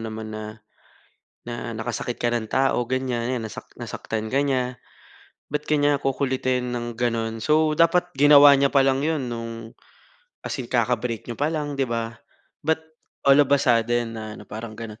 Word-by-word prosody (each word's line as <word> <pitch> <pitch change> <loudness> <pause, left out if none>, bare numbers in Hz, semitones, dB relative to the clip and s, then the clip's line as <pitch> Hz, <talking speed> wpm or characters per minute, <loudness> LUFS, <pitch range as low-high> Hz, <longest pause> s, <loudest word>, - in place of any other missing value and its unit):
naman 110 -1 -6
na 110 0 -5 1.0
na 120 0 -5
nakasakit 120 +1 -3
ka 120 0 0
ng 115 -2 -2
tao, 135 -2 +2
ganyan, 125 -2 -1
'yan 115 - -5
nasak 110 - -9
nasaktan 110 +1 -5
ka 140 - +3
niya. 130 -3 -1 0.7
Ba't 150 +1 -3
ka - - -3
niya 145 0 +3
kukulitin 130 -2 -1
ng 120 0 -4
gano'n? 115 -1 -1
So, 155 +5 +3
dapat 170 +2 +3
ginawa 145 +1 +8
niya 140 0 +4
pa 135 -1 +3
lang 135 0 +2
'yon 145 -5 -1
no'ng 115 -1 -6 0.7
as - - -4
in 120 - -7
kaka-break 120 -2 0
niyo 120 - -5
pa 145 - +2
lang 150 -2 -2
'di 135 -2 -1
ba? 115 0 -3 0.4
But 160 +1 0 0.4
all 140 +1 +7
of 145 - +3
a 140 - +5
sudden 120 -2 +1
na 110 -1 -7
ano, - - -11
parang 110 +1 -8
gano'n. 115 -1 -8
125 Hz, 175 wpm, -24 LUFS, 115-140 Hz, 1.0 s, ginawa